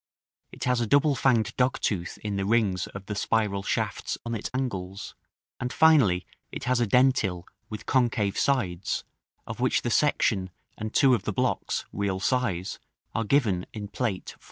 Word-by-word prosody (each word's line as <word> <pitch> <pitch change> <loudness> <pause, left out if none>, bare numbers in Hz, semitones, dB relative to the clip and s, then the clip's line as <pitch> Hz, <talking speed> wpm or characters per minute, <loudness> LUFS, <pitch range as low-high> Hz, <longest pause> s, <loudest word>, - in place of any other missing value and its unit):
it - - -8
has 125 -1 +1
a 115 - 0
double 145 +4 +4
fanged 120 -5 +2
dogtooth 105 -8 0
in 105 -1 -2
the 100 - -1
rings 100 -3 +1
of 100 0 -9
the 105 - -4
spiral 105 -1 0
shafts - - -2
on 115 - -3
its 110 - -3
angles; 100 -7 -4 0.5
and, 125 - -3
finally, 130 - +4 0.3
it - - -6
has 125 0 +1
a 120 - +2
dentil 110 -7 +3 0.3
with 105 - -7
concave 115 -6 +1
sides, 95 -10 0 0.4
of - - -7
which - - +1
the - - -1
section 95 -1 +2 0.3
and 110 0 -5
two 135 -2 +5
of 120 - +2
the - - -2
blocks, 125 +5 -1
real 100 -2 -1
size, 100 -5 -1 0.3
are 115 - 0
given 105 -7 +1
in 105 -2 -5
Plate 105 -3 -3
XIV. - - -32
110 Hz, 170 wpm, -27 LUFS, 95-125 Hz, 0.5 s, two